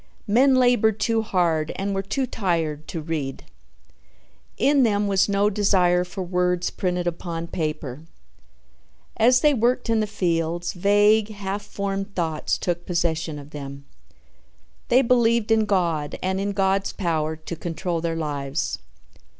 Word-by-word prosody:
Men 260 +6 +4
labored 245 -4 +3
too 225 +1 +1
hard 170 -7 0
and 200 +1 -2
were 195 - -1
too 235 +8 -2
tired 165 -9 -2
to 165 - -5
read. 150 -4 -4 1.1
In 280 0 +3
them 210 -4 +2
was 195 0 +2
no 200 +1 +2
desire 185 -3 +3
for 185 +2 -6
words 180 0 0
printed 180 -1 -2
upon 170 -1 -3
paper. 155 -3 -4 1.1
As 250 +2 +5
they 300 -1 +4
worked 245 0 +1
in 225 - +3
the 215 - 0
fields, 170 -2 -1
vague, 205 +3 +3
half 200 -1 -4
formed 200 -1 -4
thoughts 160 -3 -1
took 175 -1 -3
possession 165 -3 -1
of 145 0 -11
them. 140 -1 -8 1.0
They 255 +3 +4
believed 235 -2 +2
in 220 -1 +4
God 170 -7 0
and 190 +1 0
in 200 0 -2
God's 195 0 +1
power 160 -4 -1
to 155 +2 -7
control 170 +1 -3
their 165 -1 -2
lives. 145 -2 -3
185 Hz, 140 wpm, -23 LUFS, 165-210 Hz, 1.1 s, As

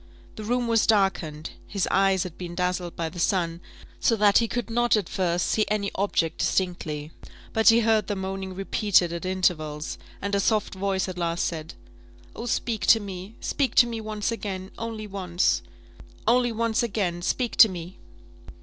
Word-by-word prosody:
The 215 - -7
room 245 +2 0
was 230 -1 +3
darkened, 185 -8 +1 0.2
his 195 -2 -1
eyes 195 -1 +3
had 180 -3 -8
been 175 -1 -7
dazzled 180 -1 -2
by 165 - -2
the 175 +2 -8
sun, 170 -1 0 0.4
so 230 - +3
that 205 -2 +5
he 230 - +1
could 240 0 -3
not, 240 +1 +3
at 200 -5 -2
first, 175 -2 0
see 215 - +2
any 205 -2 -1
object 175 -4 0
distinctly; 160 -5 -1 0.4
but 220 0 +5
he 230 +1 +6
heard 220 -3 +2
the 205 - -1
moaning 190 0 -4
repeated 195 -2 +2
at 170 +1 -5
intervals, 155 -5 -1 0.2
and 200 +1 -4
a 200 - +3
soft 210 +1 +1
voice 190 0 -1
at 180 -1 -6
last 170 0 0
said 160 - -5 0.6
"Oh, 235 - -6
speak 225 -1 -1
to 225 - +7
me! 195 +1 -8
speak 275 -3 -1
to 240 - +7
me 230 -2 -4
once 215 0 -2
again 195 -4 -5
only 225 -1 -5
once 185 -3 0 0.7
only 245 0 +4
once 230 0 0
again, 195 -7 -1
speak 240 +6 -1
to 220 - +9
me!" 180 0 -8
195 Hz, 175 wpm, -25 LUFS, 175-220 Hz, 0.7 s, to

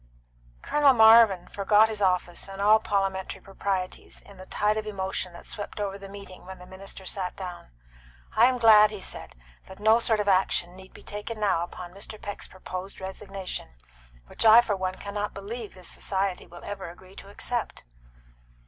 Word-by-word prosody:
Colonel 285 -3 +4
Marvin 220 -5 +7
forgot 205 +2 +4
his 215 -1 -5
office 180 -2 0
and 195 0 -9
all 210 +2 +6
parliamentary 195 -3 -2
proprieties 195 -1 -4
in 200 - -16
the 185 0 -12
tide 210 +1 +1
of 215 0 -3
emotion 190 -2 -3
that 170 - -12
swept 205 0 -7
over 200 -1 -3
the 195 0 -10
meeting 200 -2 -11
when 190 0 -8
the 180 - -13
minister 190 +1 -10
sat 185 -1 -3
down. 180 - -8 0.7
"I 230 +3 +7
am 255 -1 +1
glad," 215 -3 +7
he 210 -1 -7
said, 185 - -7 0.3
"that 190 - -12
no 220 +2 +5
sort 225 -2 +1
of 205 - -1
action 185 -2 +2
need 190 0 -13
be - - -15
taken 210 +2 -6
now 195 -5 +2
upon 175 0 -7
Mr. 200 +2 -7
Peck's 205 0 -7
proposed 185 +1 -7
resignation, 190 - -7 0.5
which - - -5
I 225 +1 +9
for 215 -4 -1
one 185 -1 -3
cannot 205 +1 -5
believe 210 +2 -7
this 185 -2 -10
society 195 -1 -2
will 175 0 -13
ever 195 -3 -6
agree 185 +2 -15
to 195 - -10
accept." 235 +3 -4
195 Hz, 180 wpm, -27 LUFS, 185-210 Hz, 0.7 s, I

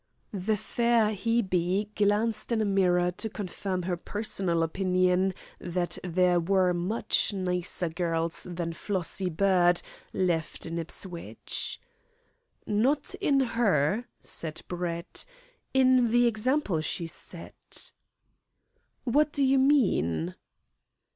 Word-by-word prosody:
The 205 +2 0
fair 235 0 +2
Hebe 200 -2 0
glanced 215 +2 +1
in 230 - +2
a 215 - +1
mirror 180 -3 +2
to 220 +5 -5
confirm 190 -2 -4
her 180 0 -1
personal 180 -3 -1
opinion 185 +2 +1 0.2
that 175 0 -2
there 180 0 +3
were 185 +1 +2
much 185 +4 0
nicer 180 -2 0
girls 165 0 -1
than 170 -1 -3
Flossie 185 0 -1
Bird 180 0 +3 0.3
left 170 -4 -1
in 165 0 -3
Ipswich. 170 +1 -5 0.9
"Not 260 +8 +1
in 275 -2 +3
her," 220 - +1
said 155 -2 -3
Brett; 175 -1 -4 0.5
"in 255 -2 +4
the 240 +1 +4
example 230 - +1
she 170 +2 -1
set." 165 - -8 1.1
"What 295 +4 +2
do 285 - 0
you 265 0 +4
mean?" 90 - +2
185 Hz, 110 wpm, -28 LUFS, 175-220 Hz, 1.1 s, in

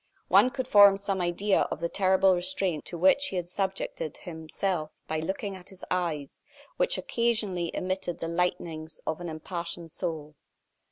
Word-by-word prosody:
One 255 - +6
could 260 -1 -4
form 200 -3 +8
some 195 -1 -2
idea 180 +4 +1
of - - -4
the 170 - 0
terrible 190 +1 +4
restraint 180 -2 0
to 175 - -6
which 190 - +4
he 195 - -5
had 175 -1 -2
subjected 190 -4 -3
himself 160 0 -3
by 160 - -1
looking 195 +4 -3
at 185 0 -12
his 190 -1 -11
eyes, 165 -6 -2 0.4
which - - +2
occasionally 215 -7 0
emitted 185 -1 -2
the 165 - -4
lightnings 165 -2 -2
of 160 +2 -2
an 175 - -4
impassioned 170 +1 -4
soul. 155 -4 -5
180 Hz, 160 wpm, -28 LUFS, 165-195 Hz, 0.4 s, form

